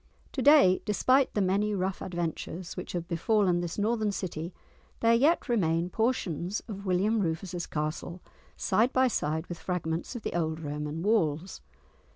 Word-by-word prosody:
To 270 - -3
day, 275 -10 +6
despite 255 +5 +3
the 205 - +2
many 205 +3 +1
rough 190 0 -2
adventures 175 0 -4
which - - -6
have 170 -1 -3
befallen 180 0 +2
this 170 -1 -4
northern 215 0 +1
city, 170 -3 -4 0.5
there 230 0 +4
yet 290 +9 +3
remain 175 -7 +1
portions 205 - -1
of 200 -3 -7
William 200 +5 +2
Rufus's 175 0 -2
castle, 155 +3 -4 0.4
side 220 +7 +2
by 260 0 +4
side 160 -8 -1
with 175 -2 -7
fragments 170 +3 -3
of 235 - -6
the - - -3
old 160 -2 -1
Roman 150 +1 -4
walls. 185 -5 0
185 Hz, 155 wpm, -29 LUFS, 165-215 Hz, 0.5 s, day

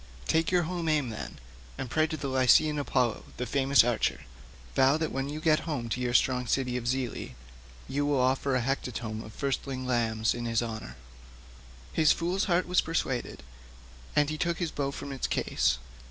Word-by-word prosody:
Take 160 0 +2
your 180 -1 +3
home 170 -1 -2
aim 150 -5 +1
then, 110 - -6 0.4
and 135 - -4
pray 155 +5 +2
to 155 -3 -4
Lycian 135 +3 +4
Apollo, 125 -5 0
the 125 - -2
famous 135 -1 +4
archer; 120 -1 0 0.5
vow 135 +2 +4
that 160 -1 -2
when 135 +1 -2
you 150 +1 -4
get 155 +1 +2
home 120 -7 -2
to 125 - -2
your 120 -1 0
strong 125 -1 +3
city 125 0 0
of 120 -1 -3
Zelea 125 - -2 0.5
you 145 +1 -1
will 145 -2 +2
offer 130 +1 +2
a 125 - +2
hecatomb 120 -4 -3
of 110 - -10
firstling 135 0 -3
lambs 115 -3 +1
in 120 0 -5
his 115 0 +1
honour." 110 -2 -6 1.0
His 155 -2 +5
fool's 180 +4 -1
heart 180 -2 +2
was 180 0 +3
persuaded, 135 -6 -2 0.7
and 150 0 +3
he 155 - -4
took 170 -1 0
his 170 -3 -2
bow 140 -1 -1
from 140 0 -6
its 135 - -2
case. 65 0 +1
135 Hz, 185 wpm, -29 LUFS, 120-155 Hz, 1.0 s, His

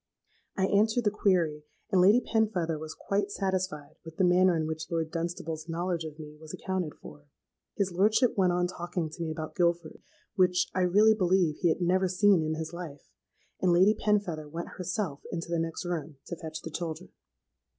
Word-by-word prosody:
—I 190 - +2
answered 220 +4 +2
the 210 - +2
query; 175 -8 +1 0.3
and 185 - +4
Lady 205 +7 +6
Penfeather 185 -10 0
was 155 0 -7
quite 200 0 -1
satisfied 185 -7 -3
with 160 -1 -11
the - - +2
manner 180 0 +4
in 160 - -1
which 160 0 -5
Lord 165 -2 -2
Dunstable's 165 -1 -4
knowledge 170 0 -2
of 155 -1 -8
me 150 -1 -10
was 155 -1 -8
accounted 185 -5 -3
for. 75 -1 -13 0.5
His 195 -2 0
lordship 215 +7 +3
went 185 -3 +3
on 180 0 +1
talking 175 -2 -4
to 165 - -9
me 165 - -2
about 155 0 -5
Guilford, 170 -2 0 0.3
(which, 180 -3 +2
I 185 - 0
really 205 +5 +5
believe, 185 -6 +2
he 175 - +2
had 160 - 0
never 185 +2 +2
seen 190 0 +4
in 155 0 -1
his 160 +1 -5
life); 165 -5 -9 0.5
and 185 - +3
Lady 185 +5 +5
Penfeather 200 -8 -1
went 170 +3 -5
herself 185 -5 -3
into 170 0 -4
the 170 - +1
next 165 +2 -3
room 160 -4 -4
to 170 - -5
fetch 160 -1 -7
the 160 - -6
children. 165 +2 -5
175 Hz, 190 wpm, -29 LUFS, 160-190 Hz, 0.5 s, Lady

